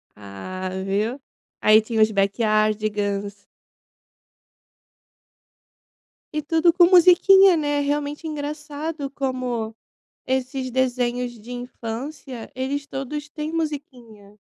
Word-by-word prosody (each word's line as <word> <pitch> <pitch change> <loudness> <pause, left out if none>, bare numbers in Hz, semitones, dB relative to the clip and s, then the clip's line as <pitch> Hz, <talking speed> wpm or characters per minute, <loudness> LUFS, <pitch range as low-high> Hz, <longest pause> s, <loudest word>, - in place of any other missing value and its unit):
Ah, 105 - -7 0.2
viu. 215 +7 -1 0.4
Aí 215 +1 +6
tinha 220 0 -1
os 215 0 +5
Backyardigans. 205 -1 0 2.9
E 305 - -1
tudo 325 +3 +3
com 350 0 +6
musiquinha, 365 +1 +7
né, 290 -1 0
realmente 290 +2 -2
engraçado 300 0 -5
como 255 -5 -3 0.5
esses 260 0 -2
desenhos 245 -1 0
de 235 +4 -9
infância, 245 +1 -7
eles 275 +2 -3
todos 290 +2 -5
têm 305 +1 -5
musiquinha. 245 -10 -6
260 Hz, 90 wpm, -23 LUFS, 215-295 Hz, 2.9 s, musiquinha